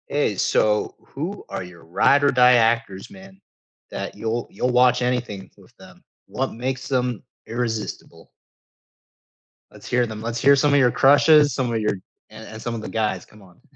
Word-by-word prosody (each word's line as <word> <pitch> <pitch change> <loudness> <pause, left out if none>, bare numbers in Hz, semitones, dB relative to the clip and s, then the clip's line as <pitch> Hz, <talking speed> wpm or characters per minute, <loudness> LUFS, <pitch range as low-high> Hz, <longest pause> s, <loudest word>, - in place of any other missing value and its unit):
Hey, 145 -7 -1
so 105 +2 0
who 170 +9 -7
are - - -5
your 90 -2 -14
ride 100 +12 +2
or 140 - +4
die 125 -1 +5
actors, 115 -4 0
man, 190 0 -15 0.5
that - - -6
you'll 115 +1 -3
you'll 125 +5 -2
watch 125 0 +3
anything 125 -6 -3
with - - -21
them? - - -17 0.2
What 125 +7 -3
makes 130 +2 -4
them 125 -3 -2 0.2
irresistible? 115 -2 -5 1.4
Let's - - -14
hear 125 0 +1
them. 110 -2 -8
Let's 115 +1 -4
hear 140 +3 +5
some 145 +1 +2
of 145 - +5
your 125 -2 +3
crushes, 145 +2 +5
some 125 -2 -2
of 115 - 0
your 105 - 0 0.4
and 110 +1 -12
and 110 0 -10
some 120 0 -4
of 115 - -6
the - - -7
guys. 105 -5 -2
Come 105 - -19
on. 90 -3 -20
120 Hz, 180 wpm, -22 LUFS, 110-135 Hz, 1.4 s, die